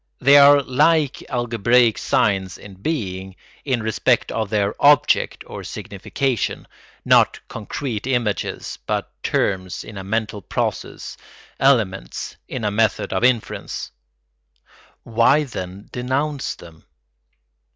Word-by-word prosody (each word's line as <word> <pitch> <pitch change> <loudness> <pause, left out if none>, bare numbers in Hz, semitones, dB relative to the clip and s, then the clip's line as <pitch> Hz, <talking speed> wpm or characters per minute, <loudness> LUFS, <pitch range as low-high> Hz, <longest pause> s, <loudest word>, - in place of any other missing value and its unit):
They 140 +2 +6
are 140 0 +7
like 145 +2 +2
algebraic 120 -1 +2
signs 95 -3 0
in 105 - -12
being, 95 - -3 0.3
in 125 -5 0
respect 110 -1 +1
of 110 -2 -2
their 100 -1 0
object 145 0 +3
or - - -8
signification, 130 -5 -3 0.4
not - - +4
concrete 115 +1 -5
images 120 -7 -2
but - - -2
terms 95 -2 -1
in 105 -2 -9
a - - -7
mental 105 +1 -2
process, - - -4 0.4
elements 105 - +1
in 125 - -5
a 105 - 0
method 110 0 0
of 95 - -1
inference. 125 -3 -1 1.1
Why, 120 +6 +3
then, 95 -7 -7
denounce 135 +4 -2
them? 80 -2 -15
115 Hz, 110 wpm, -21 LUFS, 100-135 Hz, 1.1 s, are